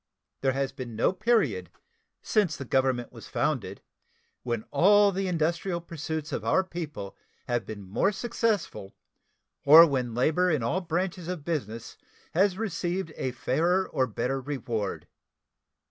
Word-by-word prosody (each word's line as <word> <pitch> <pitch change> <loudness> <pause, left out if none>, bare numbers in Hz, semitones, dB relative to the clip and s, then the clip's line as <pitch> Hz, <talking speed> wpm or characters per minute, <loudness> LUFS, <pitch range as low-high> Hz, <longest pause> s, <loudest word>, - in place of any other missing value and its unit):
There 135 -1 +2
has 135 0 -1
been 120 -3 -7
no 115 - +2
period 185 - +1 0.5
since 190 -8 +1
the 140 - -6
Government 130 -1 +1
was - - -11
founded - - -2 0.6
when 120 -3 -2
all 205 +2 +5
the 195 0 -2
industrial 170 +1 0
pursuits 160 -2 -5
of - - -3
our 190 - +3
people 160 - -6 0.3
have 120 -2 -1
been 105 -2 -7
more 100 - +1
successful 210 - -2 0.7
or 155 +4 +10
when 130 -6 -2
labor 160 +8 +2
in 150 -8 +1
all 170 +12 0
branches 175 0 -2
of 175 -5 -5
business 115 -9 -4 0.4
has 190 +2 +3
received 180 -4 -2
a 130 - -2
fairer 165 +9 +1
or 130 -1 0
better 125 +4 -2
reward. 120 -7 -3
155 Hz, 140 wpm, -27 LUFS, 125-180 Hz, 0.7 s, or